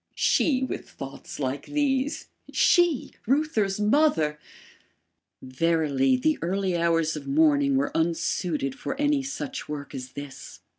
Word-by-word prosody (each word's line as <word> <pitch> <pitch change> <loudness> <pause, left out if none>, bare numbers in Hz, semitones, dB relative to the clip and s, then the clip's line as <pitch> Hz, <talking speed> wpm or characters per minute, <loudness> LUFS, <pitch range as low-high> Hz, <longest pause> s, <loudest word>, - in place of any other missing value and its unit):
SHE 265 -4 +2
with 260 - -5
thoughts 135 +2 -9
like 135 0 -3
these; 285 -1 0 0.3
SHE, 350 -7 +3 0.2
Reuther's 235 -8 +1
mother! 210 - +2 1.0
Verily, 135 -1 +1
the 155 +5 +1
early 185 +2 0
hours 165 -2 +1
of 145 -2 -7
morning 140 -1 +3
were 135 +2 +1
unsuited 160 -3 0
for 265 - -5
any 290 -1 +2
such 270 - -5
work 145 -1 -6
as 130 -1 -7
this. 140 -1 -9
165 Hz, 120 wpm, -26 LUFS, -, 1.0 s, SHE